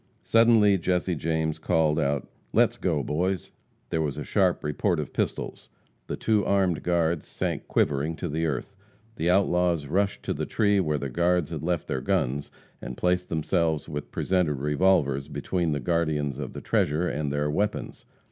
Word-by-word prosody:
Suddenly, 115 -4 +5
Jesse 90 +1 0
James 80 0 -1
called 80 -2 +2
out, 70 -1 0 0.3
"Let's - - +4
go, - - -1
boys!" 90 +5 -1 0.4
There 80 - +1
was 75 -3 -2
a - - -3
sharp - - +1
report 85 +4 0
of 75 - -5
pistols. - - -3 0.4
The - - -3
two 110 -2 +1
armed 95 -5 +1
guards 85 -2 0
sank - - -3
quivering 75 +3 +1
to 90 - -4
the 80 +1 -1
earth. 75 +7 -4 0.4
The 85 - 0
outlaws 90 -4 +2
rushed 95 +7 0
to - - -1
the - - -3
tree 100 -2 +2
where 75 -5 +1
the 70 -1 -4
guards 85 0 +1
had 80 -4 -4
left 85 0 -1
their 65 - -2
arms, 70 -7 0 0.3
and 65 - -7
placed 90 0 0
themselves 80 -1 0
with 75 0 -5
presented 90 -5 0
revolvers 70 -1 +2
between 85 -4 -1
the 75 - -1
guardians 75 -2 0
of 70 - -5
the - - -7
treasure 75 +5 +1
and 75 -3 -2
their 75 +1 0
weapons. 105 +7 -2
80 Hz, 170 wpm, -26 LUFS, 75-90 Hz, 0.4 s, Suddenly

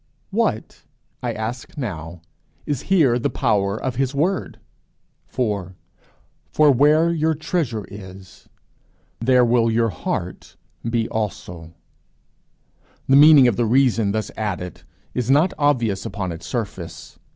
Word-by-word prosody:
What, - - -1 0.4
I - - -2
ask 115 +7 -6
now, 85 - -6 0.4
is 145 -4 -2
here 145 -11 +4
the - - 0
power 105 -4 0
of 130 -2 -4
his 135 +1 -1
word 180 +7 -1 0.7
For: 100 -7 -3 0.8
For 150 -1 +5
where 150 +5 +4
your 160 -1 +1
treasure 145 - -2
is, 95 -1 -12 0.7
there 125 +1 +4
will 115 -1 +3
your 115 0 +1
heart 85 - -5 0.3
be 115 -1 0
also? 90 -6 -5 1.3
The 135 - +5
meaning 145 -2 +8
of 120 - +1
the 120 - +1
reason 115 -4 +2
thus 110 0 -3
added 90 -5 -4 0.3
is 125 -1 -2
not 150 +7 +4
obvious 120 -9 +1
upon 95 -3 -4
its 85 0 -8
surface. 90 -8 -6
115 Hz, 125 wpm, -21 LUFS, 100-140 Hz, 1.3 s, meaning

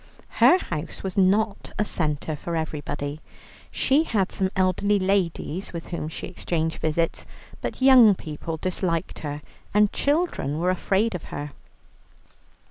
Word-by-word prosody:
Her 360 - +8
house 170 - -5
was 190 -1 -3
not 200 +2 +2
a 210 - +1
centre 155 -4 -1
for 170 +3 -4
everybody. 150 -2 -4 0.5
She 275 +3 +2
had 210 - 0
some 190 -2 0
elderly 190 +2 +2
ladies 190 -2 -1
with 165 -1 -6
whom 165 -3 -4
she - - -6
exchanged 160 -2 -2
visits, 160 +1 -1 0.3
but - - -4
young 250 -6 +8
people 160 0 -6
disliked 175 -1 -2
her, 145 -1 -5 0.3
and 210 -1 +4
children 285 - 0
were 180 +3 +2
afraid 195 +4 +1
of 180 - -5
her. 145 0 -6
180 Hz, 135 wpm, -25 LUFS, 155-200 Hz, 0.5 s, Her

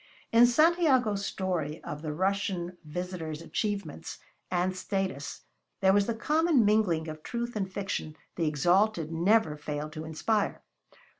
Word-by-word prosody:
In 235 +1 +7
Santiago's 260 - +3
story 165 -5 -2
of 150 0 -6
the 155 -1 -3
Russian 185 +1 -1
visitor's 160 -1 -5
achievements 200 -1 -3 0.3
and 180 +1 0
status 185 -8 -3 0.4
there 190 0 +4
was 200 0 +3
the 235 - -1
common 305 +1 +3
mingling 200 -7 +2
of 155 0 -7
truth 235 +5 -4
and 195 -3 -2
fiction 190 -6 -3 0.2
the 165 -3 0
exalted 175 +3 +2
never 175 0 +3
fail 150 0 -5
to 155 0 -6
inspire. 200 +7 -1
185 Hz, 135 wpm, -29 LUFS, 160-215 Hz, 0.4 s, In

